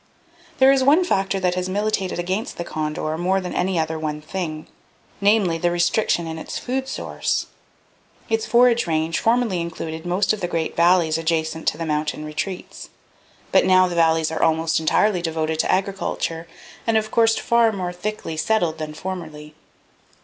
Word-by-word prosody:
"There 265 0 +6
is 270 -1 +3
one 300 +7 +5
factor 195 - 0
that 180 -1 +1
has 180 0 -2
militated 200 -1 -1
against 185 +5 -3
the 170 - -3
condor 155 0 -3
more 185 +2 +1
than 180 -1 -5
any 185 0 0
other 160 0 -1
one 150 -1 -3
thing; 155 -1 -5 0.6
namely, 200 -5 +3
the 175 - +2
restriction 175 +1 +1
in 160 0 -5
its - - -6
food 260 +1 -3
source. - - -2 0.8
Its 225 -1 -1
forage 240 -2 +4
range 160 0 0
formerly 225 -6 +1
included 160 -1 -5
most 180 +4 +1
of 215 - -4
the 175 - -1
great 165 -2 -2
valleys 170 -2 +3
adjacent 160 -1 -1
to - - +1
its 165 - -3
mountain 150 0 -2
retreats. 180 +5 -6 0.6
But - - +5
now 185 0 +5
the 180 - -4
valleys 160 -1 +2
are 160 - -3
almost 160 0 +2
entirely 180 +4 +2
devoted 160 -1 -2
to - - +2
agriculture, 185 -4 -2 0.4
and 225 -1 +3
of 215 0 -1
course 225 -1 +3
far 235 -1 +3
more 185 -4 -4
thickly 180 -2 -5
settled 170 -3 0
than 155 -1 -5
formerly. 155 -5 -7
175 Hz, 170 wpm, -22 LUFS, 160-200 Hz, 0.8 s, There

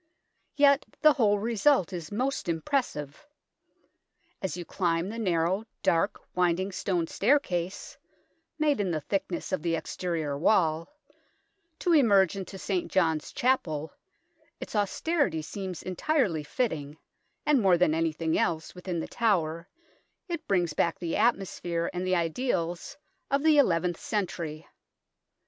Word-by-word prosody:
Yet 285 -1 +5 0.2
the 305 -1 +8
whole 210 -7 +3
result 225 - +2
is 170 -3 -6
most 255 -2 -1
impressive. 160 - -2 1.1
As 190 -2 -3
you 175 - -6
climb 170 0 0
the 230 +2 -5
narrow, 185 +1 +1 0.2
dark, 170 +5 +2
winding 180 +2 +1
stone 180 -3 -1
stair 240 - +3
case, 180 -6 -4 0.6
made 300 -4 +2
in 200 -3 0
the 155 -3 -1
thickness 185 +1 -3
of 185 - 0
the 165 0 0
exterior 165 -4 -3
wall, 165 0 +2 0.9
to 345 - +1
emerge 200 - +5
into 195 0 -6
St. 345 - -2
John's 160 -4 +1
Chapel, 160 - 0 0.7
its - - -7
austerity 205 - 0
seems 190 +2 -6
entirely 185 - 0
fitting, 150 - -2 0.5
and 290 -4 +4
more 190 -3 +5
than 170 -3 +3
anything 160 0 0
else 160 -2 -1
within 180 -2 -4
The - - -5
Tower 170 -7 0 0.6
it 335 -3 -5
brings 175 -5 +1
back 165 +2 +1
the 170 -2 -3
atmosphere 175 -6 0
and 180 +1 -3
the 185 - +2
ideals 175 - -2 0.3
of 275 +1 +1
the 310 -2 +5
eleventh 175 - +2
century. 170 -7 -3
185 Hz, 130 wpm, -28 LUFS, 165-230 Hz, 1.1 s, the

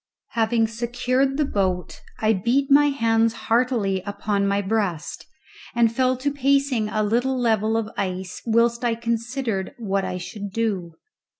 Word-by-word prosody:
Having 225 0 +2
secured 250 +4 0
the 300 - +2
boat 185 - -2 0.2
I 220 0 +2
beat 245 +8 +1
my 290 +1 +7
hands 230 -4 +2
heartily 230 -5 0
upon 200 0 -1
my 200 0 +1
breast, 195 -6 -2 0.5
and 230 -1 +3
fell 255 0 +2
to 285 +3 -1
pacing 275 -5 +1
a 215 0 0
little 245 +5 +1
level 220 -2 +2
of 225 -2 -1
ice 185 -1 -4
whilst 235 +1 +2
I 235 -1 +1
considered 230 -3 -2
what 200 -4 -1
I 185 -1 -3
should 205 +3 -6
do. 195 -6 -2
225 Hz, 145 wpm, -23 LUFS, 200-245 Hz, 0.5 s, my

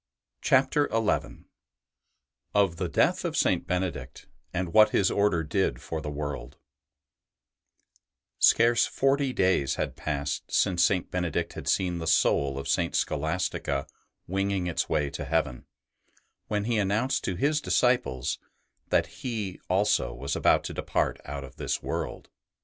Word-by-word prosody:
CHAPTER 135 +3 +3
XI 115 -1 -1 1.1
OF 100 -5 +3
THE - - -2
DEATH - - +2
OF - - -2
SAINT - - +1
BENEDICT, 85 -8 -3 0.3
AND 85 -1 -3
WHAT 110 0 +7
HIS 95 -2 +2
ORDER 100 -5 +2
DID 75 -6 0
FOR 80 -1 -5
THE 75 - -5
WORLD 70 -2 -5 1.8
Scarce 115 0 +5
forty 135 0 +1
days 90 - +2
had - - -3
passed 70 -1 -3
since 85 -2 +2
St. 90 0 +1
Benedict 90 -3 -2
had - - -8
seen 90 -2 +1
the 80 - -5
soul 70 -2 +2
of 70 0 -5
St. 85 -1 0
Scholastica 80 -3 -1 0.4
winging 95 0 -1
its 85 -2 -1
way 70 -2 0
to - - -5
heaven, 75 -3 -1 0.8
when 105 -1 -1
he 115 0 0
announced 105 +7 0
to 95 - -1
his 150 - +1
disciples 120 - +1 0.5
that - - +3 0.2
he 110 -7 -4
also 100 +3 +2
was 70 +2 -3
about - - +3
to - - -5
depart - - -1
out 70 0 -5
of 70 -1 -12
this - - -2
world. - - -4
90 Hz, 140 wpm, -27 LUFS, 70-105 Hz, 1.8 s, WHAT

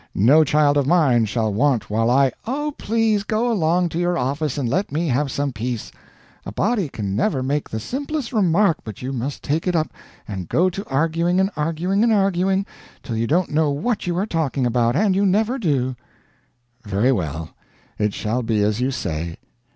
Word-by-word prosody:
No 140 +11 +6
child 145 -1 +3
of 140 -2 +1
mine 140 -9 +4
shall 110 0 -1
want 125 -1 +1
while 115 +2 +1
I 135 +1 +4
" - - -26
"Oh, 295 +4 -2
please 220 -2 +1
go 225 +3 0
along 175 -3 +2
to 165 - -3
your 175 0 +1
office 140 +3 -1
and 135 -4 -1
let 180 - -1
me 165 +4 -1
have 135 +3 +1
some 140 +1 -1
peace. 120 0 -4 0.5
A - - -7
body 200 - 0
can 100 -6 -4
never 130 - 0
make 145 +2 -1
the 110 - -3
simplest 275 - -4
remark 190 -3 +3
but 110 +1 -8
you 130 +2 -3
must 135 +3 -4
take 155 +5 -1
it 180 - +1
up 160 -1 0 0.3
and 95 -5 -6
go 185 +3 +2
to 195 +3 -5
arguing 165 +5 +1
and 190 +1 +2
arguing 165 +6 0
and 235 - +3
arguing 195 -1 +2 0.4
till 115 - -4
you 115 +1 0
don't 170 +6 +1
know 155 0 +2
what 180 +9 -2
you 175 -1 -1
are 190 - +1
talking 155 - -1
about, 120 0 +1
and 195 +2 +2
you 200 - +2
never 215 +7 +1
do." 135 - 0 0.9
"Very 105 +4 +1
well, 80 - -3 0.5
it 105 -1 0
shall 115 +4 -1
be 110 -3 +1
as 105 +3 0
you 130 - +1
say. 85 -9 -4
150 Hz, 195 wpm, -21 LUFS, 120-185 Hz, 0.9 s, No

